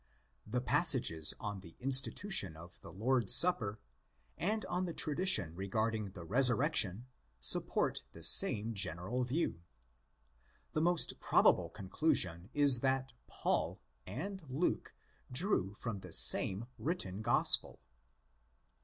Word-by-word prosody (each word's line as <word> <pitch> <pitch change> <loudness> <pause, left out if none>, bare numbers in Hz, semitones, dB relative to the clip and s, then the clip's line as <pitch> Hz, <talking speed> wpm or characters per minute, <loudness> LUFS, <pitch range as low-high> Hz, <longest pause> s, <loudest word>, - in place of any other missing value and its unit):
The 125 +3 -2
passages 130 - +2
on 105 -3 -6
the 85 -3 -14
institution 130 - 0
of 85 +2 -15
the - - -12
Lord's 120 +1 +2
supper 115 - +3 0.6
and 215 +3 -3
on 180 +1 -3
the 170 - -7
tradition 145 - +3
regarding 105 +3 -3
the 90 - -10
resurrection 125 - +3 0.3
support - - +1
the - - -14
same 110 +2 +2
general 95 +5 -2
view. 125 - -3 1.1
The 155 - -1
most 175 0 0
probable - - +2
conclusion 95 - -1
is 140 -4 +5
that 130 0 -2
'' - - -44 0.2
Paul" - - -1 0.3
and 190 - -6
'"' - - -18
Luke" 145 +7 -3 0.4
drew 125 - -1
from 110 -2 -6
the 90 -3 -7
same 95 +6 +3
written 110 - -4
Gospel.! 120 +2 +1
120 Hz, 120 wpm, -33 LUFS, 95-145 Hz, 1.1 s, is